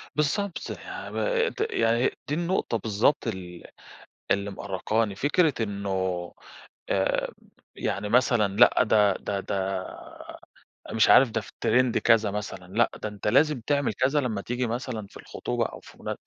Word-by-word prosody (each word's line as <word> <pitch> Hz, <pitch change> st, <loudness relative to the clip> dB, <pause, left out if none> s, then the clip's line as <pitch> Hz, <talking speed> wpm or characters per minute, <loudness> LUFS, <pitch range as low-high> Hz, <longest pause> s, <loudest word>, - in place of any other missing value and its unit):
بالضبط، 165 Hz, +6 st, 0 dB
يعني -, -, -7 dB
ب -, -, -9 dB, 0.4 s
د 440 Hz, +2 st, -1 dB
يعني 115 Hz, +2 st, +2 dB, 0.2 s
دي 145 Hz, -, -2 dB
النقطة 170 Hz, -8 st, 0 dB
بالضبط 110 Hz, +5 st, +1 dB
ال 90 Hz, -4 st, -6 dB, 0.7 s
اللي 100 Hz, 0 st, +1 dB
مأرّقاني. 100 Hz, +2 st, -1 dB
فكرة 150 Hz, -, +2 dB
إنه 100 Hz, -1 st, -4 dB, 1.0 s
آآ، -, -, 0 dB, 0.4 s
يعني 105 Hz, +1 st, -2 dB
مثلًا، 110 Hz, -4 st, +2 dB
لأ، 120 Hz, +2 st, +6 dB
ده 105 Hz, -3 st, +4 dB
ده 100 Hz, -1 st, -3 dB
ده 95 Hz, -1 st, -2 dB, 1.1 s
مش 110 Hz, 0 st, +3 dB
عارف، 130 Hz, -2 st, +7 dB
ده 110 Hz, -, -1 dB
في -, -, -13 dB
trend 125 Hz, +1 st, +3 dB
كذا 110 Hz, -3 st, +3 dB
مثلًا. 100 Hz, -3 st, -5 dB
لأ 120 Hz, +2 st, +3 dB
ده 110 Hz, -, -1 dB
أنتَ 105 Hz, 0 st, -6 dB
لازِم 150 Hz, +4 st, +3 dB
تعمل 140 Hz, +3 st, 0 dB
كذا 135 Hz, +3 st, +1 dB
لمَّا 110 Hz, -6 st, -2 dB
تيجي 125 Hz, +2 st, -2 dB
مثلًا 115 Hz, -3 st, -4 dB
في -, -, -14 dB
الخُطوبة -, -, -3 dB
أو -, -, -7 dB
في -, -, -16 dB
منا -, -, -3 dB
110 Hz, 150 wpm, -26 LUFS, 100-130 Hz, 1.1 s, عارف